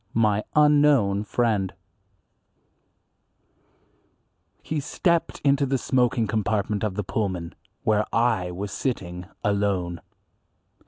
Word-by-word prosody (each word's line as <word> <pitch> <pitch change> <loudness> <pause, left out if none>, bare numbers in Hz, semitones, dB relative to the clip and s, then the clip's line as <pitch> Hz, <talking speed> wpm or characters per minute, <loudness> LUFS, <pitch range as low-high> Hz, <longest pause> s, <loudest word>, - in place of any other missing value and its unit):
IV. 100 - -32
My 105 -2 +2
Unknown 145 -9 +4
Friend 105 -4 0 2.9
HE 155 - -2
STEPPED 170 +4 0
into 140 0 +3
the 135 +1 +1
smoking 125 -2 +1
compartment 105 -1 -1
of 105 -3 -1
the 105 - -2
Pullman, 95 -4 -3 0.3
where 105 -1 +2
I 115 -6 +1
was 95 +3 -5
sitting 90 -8 -4 0.2
alone. 100 -4 0
105 Hz, 100 wpm, -25 LUFS, 100-125 Hz, 2.9 s, Unknown